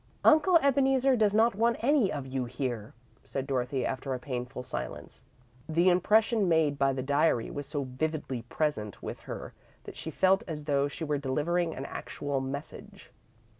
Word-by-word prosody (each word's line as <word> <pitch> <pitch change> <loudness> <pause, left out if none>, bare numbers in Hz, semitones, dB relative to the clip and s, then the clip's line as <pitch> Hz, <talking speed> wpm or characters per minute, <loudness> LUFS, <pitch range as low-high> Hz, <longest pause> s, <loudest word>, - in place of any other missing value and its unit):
"Uncle 335 +3 +6
Ebeneezer 270 -1 +3
does 210 -3 +2
not 230 +2 +4
want 230 +3 +2
any 260 -4 +3
of 140 -3 -4
you 130 -1 -2
here," 120 -3 -4 0.3
said 135 -1 -4
Dorothy, 130 -1 -1
after 130 0 -2
a - - -5
painful 125 0 -5
silence. - - -7 0.5
The 170 +3 +4
impression 210 +3 +3
made 155 -4 +2
by 135 0 +3
the 130 -1 -3
diary 140 -3 +1
was 145 -1 -5
so 145 -2 -2
vividly 135 -1 -3
present 120 - -3
with - - -5
her - - -7 0.3
that - - -10
she - - -6
felt 190 +5 +3
as 155 -3 -5
though 140 -1 +1
she 145 +3 -7
were 150 -2 -1
delivering 160 +5 0
an 135 - -5
actual 140 -1 -4
message. 140 +4 -8
145 Hz, 170 wpm, -29 LUFS, 130-195 Hz, 0.5 s, Uncle